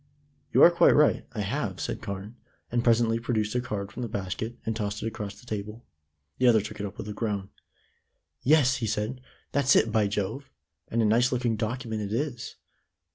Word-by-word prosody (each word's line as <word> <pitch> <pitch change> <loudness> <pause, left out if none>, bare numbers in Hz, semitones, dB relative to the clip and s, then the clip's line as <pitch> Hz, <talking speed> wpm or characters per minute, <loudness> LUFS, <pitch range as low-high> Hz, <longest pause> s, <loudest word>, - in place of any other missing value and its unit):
"You - - +6
are 175 - +9
quite 170 - +5
right; 150 0 +3
I 105 - -3
have," 100 -3 -2
said - - -3
Carne, 100 +1 -6 0.4
and 120 0 +1
presently 115 -1 +3
produced 110 -3 -1
a 125 - +1
card 100 -5 -4
from 125 - -7
the 120 - -3
basket, 100 +4 -4
and 110 - -1
tossed 105 -2 -3
it - - -1
across 105 -3 -6
the - - -17
table. 105 +1 -6 0.5
The 130 - +4
other 115 -2 +6
took 105 +1 -7
it 100 - -2
up 100 - -11
with 105 - -6
a 105 - -4
groan. 100 -3 -3 0.9
"Yes," 130 -3 +4
he 115 -3 -2
said, 110 +5 -2 0.3
"that's 140 -1 +3
it, 110 - +4
by 110 -2 +3
Jove! 105 +7 -3 0.4
And 115 0 +1
a - - +3
nice 120 +4 +3
looking 120 -3 0
document 110 0 -3
it 105 0 -4
is. 130 -2 -3
110 Hz, 200 wpm, -27 LUFS, 105-125 Hz, 0.9 s, are